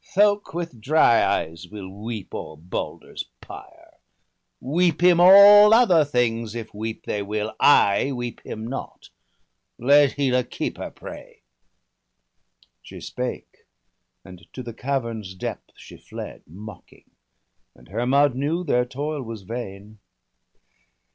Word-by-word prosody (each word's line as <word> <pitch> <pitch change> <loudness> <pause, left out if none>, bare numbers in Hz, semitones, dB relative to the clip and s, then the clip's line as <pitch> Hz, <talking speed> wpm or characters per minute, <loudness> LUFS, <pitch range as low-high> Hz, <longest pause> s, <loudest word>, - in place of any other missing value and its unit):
Thok 205 -2 +2
with 170 -9 -5
dry 135 -2 +4
eyes 80 +2 -2
will 100 -1 -9 0.2
weep 110 -4 -6
o'er 80 0 -7
Balder's 85 +4 -6
pyre. - - -14 0.6
Weep 170 +5 0
him 175 -1 +5
all 205 +3 +9
other 190 -10 +5
things, 115 -5 -1
if 115 -2 -7
weep 110 +2 -6
they 105 - -3
will 105 +1 -4
— - - -50 0.3
I 135 +7 -1
weep 120 -2 -6
him 110 0 -7
not! 130 +4 -8 0.7
let 140 +3 +4
Hela 130 -3 +1
keep - - -5
her - - -5
prey.' - - -12 1.4
She - - -12
spake, - - -7 0.6
and 90 -1 -14
to 130 - -7
the 120 -1 -8
cavern's 115 -7 -4
depth 95 - -6
she - - -14
fled, - - -9
Mocking; 105 +7 -13 0.6
and - - -20
Hermod 130 +6 +2
knew 150 +7 -2
their 125 -6 +1
toil 145 +4 -4
was 115 -4 -8
vain. 105 -1 -8
120 Hz, 130 wpm, -23 LUFS, 105-145 Hz, 1.4 s, all